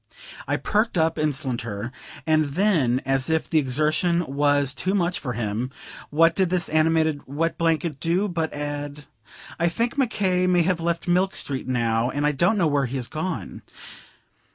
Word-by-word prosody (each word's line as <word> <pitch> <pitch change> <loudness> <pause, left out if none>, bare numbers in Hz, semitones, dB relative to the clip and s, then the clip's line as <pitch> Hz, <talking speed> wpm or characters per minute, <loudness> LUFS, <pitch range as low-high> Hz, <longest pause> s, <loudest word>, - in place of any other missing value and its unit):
I - - 0
perked 215 -1 0
up 160 0 +2
instanter, 120 -7 -2 0.3
and 155 -1 +3
then, 155 - +2
as 135 +1 +1
if 160 0 0
the 160 - +3
exertion 155 +5 +1
was 145 0 +1
too 185 +5 -1
much 180 -2 0
for 125 -4 -4
him, 115 +2 -2 0.4
what 165 +2 +4
did 190 -2 +2
this 180 -2 0
animated 155 -1 +2
wet 160 +5 -1
blanket 165 -3 0
do 175 +8 +1
but 165 -4 -2
add 145 0 -5 0.5
"I 170 +1 +3
think 235 +9 -2
Mc 260 -4 +2
K. 185 -4 +1
may 180 -1 +3
have 170 -1 0
left 170 +1 -2
Milk 185 +2 +2
Street, 135 -2 -1
now, 115 -2 +1
and 145 +2 -1
I 150 - +3
don't 175 +10 +2
know 180 - +2
where 145 -3 +1
he 130 - -5
has 125 -3 -3
gone." 165 +3 -5
155 Hz, 175 wpm, -24 LUFS, 135-175 Hz, 0.5 s, what